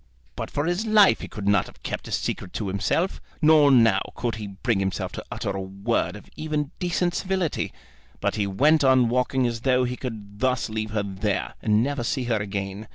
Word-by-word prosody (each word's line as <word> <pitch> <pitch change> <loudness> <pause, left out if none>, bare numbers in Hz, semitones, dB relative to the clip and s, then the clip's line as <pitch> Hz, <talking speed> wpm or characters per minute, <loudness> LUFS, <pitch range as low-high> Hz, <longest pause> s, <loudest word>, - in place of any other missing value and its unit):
But - - -4
for 145 - -2
his 175 +6 -1
life 210 -2 +6
he - - -5
could 100 -2 -6
not 100 -2 +3
have - - -17
kept - - -4
his - - 0
secret 90 - -4
to 105 -3 -3
himself. 160 - 0 0.2
Nor 155 -2 +6
now 115 -4 +5
could 120 -1 -2
he 105 -1 -5
bring 100 +2 -1
himself 95 -1 -2
to - - -7
utter - - -3
a 95 - -3
word 100 0 -1
of 105 - -12
even 150 -2 -2
decent 175 -1 0
civility. 185 -4 -1 0.5
But - - 0
he 105 -2 -1
went 150 +10 +3
on 130 -3 +5
walking 125 +1 +1
as 115 -1 -2
though 130 -1 +3
he 125 0 -2
could 105 -6 -7
thus 125 -2 0
leave 110 0 -2
her 105 -1 -1
there, 100 +1 -2
and 105 0 +3
never 140 -2 -2
see 130 +2 -1
her 120 -2 0
again. 100 0 -4
120 Hz, 210 wpm, -25 LUFS, 100-145 Hz, 0.5 s, life